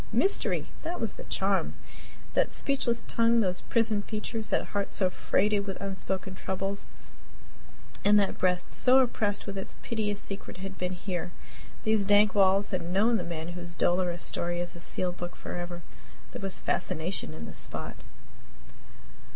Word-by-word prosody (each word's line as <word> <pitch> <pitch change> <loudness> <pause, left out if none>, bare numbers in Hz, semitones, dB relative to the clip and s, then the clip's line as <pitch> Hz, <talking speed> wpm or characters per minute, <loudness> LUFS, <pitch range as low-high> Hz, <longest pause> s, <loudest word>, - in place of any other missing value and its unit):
Mystery! 395 - +3 0.2
That 340 +2 -3
was - - -1
the - - -9
charm. - - 0 0.6
That - - +2
speechless 240 -4 +1
tongue, 230 0 +3
those 185 -3 +1
prisoned 220 -3 +1
features, 220 0 -3
that - - 0
heart 200 -1 -1
so 185 -2 +2
freighted 205 +2 +1
with 195 - -4
unspoken 190 0 -3
troubles, 195 +1 -3 1.2
and 205 +1 +6
that 200 - 0
breast 180 -1 +1
so 255 +1 +6
oppressed 220 -5 +2
with 195 -1 -4
its 190 - -7
piteous 210 -3 -1
secret 195 -1 -2
had 195 +1 -6
been 180 0 -2
here. 180 -1 -3 0.5
These 215 -1 +3
dank 205 +1 +5
walls 195 0 +4
had 185 -2 0
known 200 +7 +3
the - - -2
man 165 -1 -4
whose 175 0 -7
dolorous 175 -1 +1
story 175 0 -1
is 175 0 -4
a - - -9
sealed 180 +1 -1
book 175 0 -5
forever! 175 0 -6 0.5
There - - -7
was 195 -1 -2
fascination 175 - -1
in 80 -1 -7
the - - -8
spot. - - -6
195 Hz, 160 wpm, -29 LUFS, 180-210 Hz, 1.2 s, and